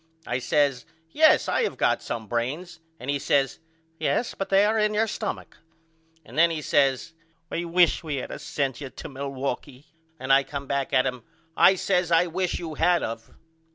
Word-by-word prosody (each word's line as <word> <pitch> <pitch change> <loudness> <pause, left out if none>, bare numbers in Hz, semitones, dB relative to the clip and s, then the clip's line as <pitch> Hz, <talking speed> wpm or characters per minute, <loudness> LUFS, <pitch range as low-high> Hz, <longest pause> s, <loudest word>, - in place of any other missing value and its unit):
I 125 - -2
says 140 -1 +1 0.3
Yes 315 - +5
I - - +1
have 460 - 0
to - - -18
got - - +2
some 110 -2 -5
brains 130 - -3 0.2
and 125 - -9
he 145 - -1
says 135 -1 +1 0.4
Yes 240 - 0
but 195 - -5
they 195 +1 +5
is 215 0 +2
in 210 0 +1
your 220 +2 +3
stumach. 215 -1 -5 0.7
And - - -13
then 170 +1 +6
he 165 -2 -3
says 140 +3 +1 0.4
I 170 - -2
wish 170 0 +3
we 155 -3 -3
had 130 - -5
of - - -7
sent 135 -2 -2
you 135 - -6
to 130 - -9
Milwaukee 135 0 -5 0.3
and 130 +1 +1
I 135 - +6
come 140 0 -6
back 140 -1 -2
at 130 -1 +3
him. 125 -2 -3 0.3
I 190 - +6
says 180 -2 0
I 165 +1 +5
wish 180 +1 -2
you 165 -2 -6
had 175 +2 +2
of. 115 0 -5
145 Hz, 195 wpm, -25 LUFS, 135-180 Hz, 0.7 s, then